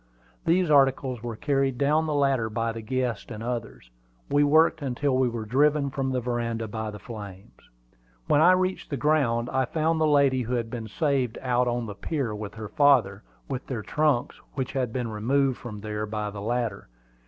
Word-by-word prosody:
These 175 -1 +3
articles 135 -3 +3
were 120 -1 -5
carried 135 -1 0
down 150 +3 +2
the 150 - -1
ladder 135 -5 +2
by 115 +1 -1
the 115 0 -6
guests 125 0 -2
and 110 -2 -7
others. 115 - -5 0.4
We 145 0 +4
worked 155 +2 +4
until 135 0 0
we 130 -1 +2
were 115 -2 -5
driven 140 +4 +2
from 135 -1 -2
the 130 - 0
veranda 115 -2 -2
by 110 +1 -4
the 105 - -7
flames. 100 -3 -11 0.6
When 145 - +3
I 175 +3 +7
reached 185 0 -1
the 140 - -2
ground, 130 -5 +1
I 130 0 +1
found 160 +4 0
the 155 - +4
lady 140 -3 +3
who 125 +1 -2
had 115 -2 -3
been 115 -3 -5
saved 130 0 0
out 125 -1 +2
on 120 0 -1
the 105 - -6
pier 135 +1 -3
with 105 0 -6
her 110 -1 -7
father, 125 -9 +3 0.3
with 135 -2 -5
their 120 -5 -4
trunks 150 -3 0
which 130 -3 -2
had 130 -4 -1
been 125 0 -2
removed 130 +5 0 0.2
there 105 0 -3
by 105 -1 -3
the 100 -1 -7
latter. 115 -2 -2
125 Hz, 190 wpm, -26 LUFS, 115-140 Hz, 0.6 s, I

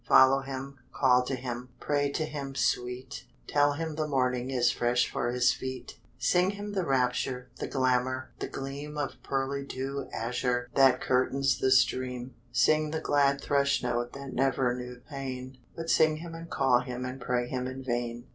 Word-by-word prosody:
Follow 135 +1 +7
him, 135 0 -6
call 125 -2 +4
to 130 +2 -2
him, 125 0 -5
Pray 145 -1 +1
to 155 +2 -1
him, 140 -3 -6
Sweet, 125 0 -1 0.2
Tell 145 0 +3
him 160 +1 -3
the 155 0 -2
morning 125 -2 0
Is 125 -2 +3
fresh 120 0 +1
for - - -2
his 125 0 +3
feet; 130 0 -7 0.2
Sing 180 +1 +3
him 205 +1 -5
the 190 -2 0
rapture, 125 -2 0
The - - -3
glamour, 130 0 0
the - - -3
gleam 140 +2 -6
Of 145 -2 -3
pearly 135 +1 -2
dew 135 0 -4
azure 125 +1 -1
That 135 -2 +5
curtains 135 +2 +2
the 130 - +2
stream; 130 -1 +2 0.2
Sing 155 0 +3
the 160 +1 -2
glad 140 -2 +2
thrushnote 125 -4 +1
That 140 -2 -7
never 130 -1 +2
knew 125 0 -7
pain, 130 -2 -6 0.2
But 165 0 -2
sing 155 -1 +4
him 165 +1 -8
and 165 0 -8
call 130 -3 +3
him 125 0 -5
And 130 +1 -6
pray 125 0 0
him 125 0 -2
in 130 +1 -6
vain. 120 -1 -2
130 Hz, 175 wpm, -29 LUFS, 125-140 Hz, 0.2 s, Follow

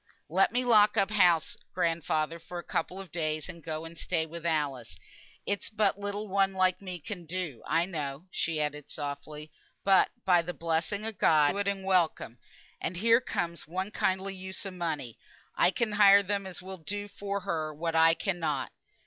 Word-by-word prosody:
"Let 190 +5 +3
me 250 +2 0
lock 215 -3 +5
up 195 +1 +3
house, 175 -6 +3 0.2
grandfather, 165 -2 0
for 170 +2 -8
a 175 - -5
couple 180 +3 -2
of 195 -2 -9
days, 155 -2 -2
and 170 -1 -10
go 155 +1 -4
and 165 +1 -9
stay 165 -1 -1
with 170 +1 -6
Alice. 145 -7 -2 0.5
It's 200 0 -2
but 210 -2 +1
little 205 +1 -4
one 195 0 +2
like 185 0 +2
me 185 -2 -4
can 175 +1 -7
do, 165 -8 -4
I 165 +1 +2
know" 150 -3 -5
(she 165 -2 -1
added 150 -1 -3
softly); 150 +1 -6 0.3
"but, 195 -1 +5 0.2
by 180 -2 +5
the 175 +1 -6
blessing 170 +6 -1
o' 225 - -2
God, 155 -8 +4
I'll - - +2
do - - -4
it 200 - -1
and 195 -1 -1
welcome; 170 -10 +1 0.4
and 175 - -3
here 230 +5 +4
comes 170 -8 -3
one 190 +5 -3
kindly 190 0 0
use 190 +1 -5
o' 195 - -4
money, 160 -10 -4 0.4
I - - +4
can 225 +3 -1
hire 200 -1 +7
them 200 0 -2
as 180 -1 -7
will 190 0 -7
do 205 +5 -4
for 200 0 -4
her 160 -5 -2
what 165 +2 -3
I 165 0 +6
cannot. 165 -7 -1
175 Hz, 190 wpm, -29 LUFS, 160-195 Hz, 0.5 s, hire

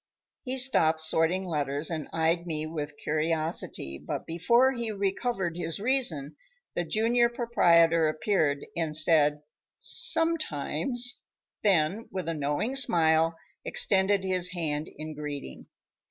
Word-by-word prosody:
He 260 0 -5
stopped 165 -12 +4
sorting 165 +4 +1
letters 145 -2 0
and 155 -3 -5
eyed 165 +2 -1
me 155 -2 -3
with 150 -2 -6
curiosity, 155 - -3
but - - -5
before 235 +11 +2
he 235 -3 -4
recovered 195 -2 -3
his 165 -1 -4
reason, 200 - 0 0.4
the 175 - -2
junior 230 +7 +1
proprietor 170 -9 +2
appeared, 155 -3 -1
and 160 -2 +1
said: 150 -2 +3 0.3
"Sometimes," 245 - +2 0.4
then 195 +1 0
with 185 -3 -5
a 165 - -2
knowing 150 - -2
smile 165 -8 +2 0.3
extended 195 0 +2
his 185 -1 0
hand 155 -3 -3
in 155 +1 -9
greeting. 145 - -8
165 Hz, 120 wpm, -27 LUFS, 155-205 Hz, 0.4 s, stopped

